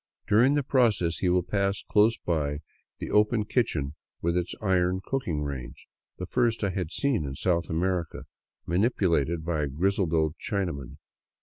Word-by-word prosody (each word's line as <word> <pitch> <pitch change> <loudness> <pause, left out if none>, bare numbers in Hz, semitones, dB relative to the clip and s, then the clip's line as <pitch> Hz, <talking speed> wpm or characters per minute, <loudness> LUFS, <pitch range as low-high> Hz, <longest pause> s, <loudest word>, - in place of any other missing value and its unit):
During 120 +7 +4
the 145 - +1
process 115 -11 +2
he 90 - +1
will 90 0 +3
pass 100 +1 -1
close 110 +2 +3
by 75 -3 -2 0.4
the - - -6
open 105 +1 +3
kitchen 75 - 0 0.3
with 85 +1 0
its 90 -1 -1
iron 95 -2 +1
cooking 85 - -2
range 70 -4 -6 0.2
— - - -64
the 90 - -4
first 115 +3 0
I 100 - +1
had 90 -3 -3
seen 135 - 0
in 70 -2 -5
South 85 +2 0
America 85 0 -1 0.2
— - - -59
manipulated 85 - +1
by 85 -3 0
a 75 - 0
grizzled 90 +5 0
old 80 -1 +1
Chinaman. 85 - -3
90 Hz, 170 wpm, -27 LUFS, 80-105 Hz, 0.4 s, During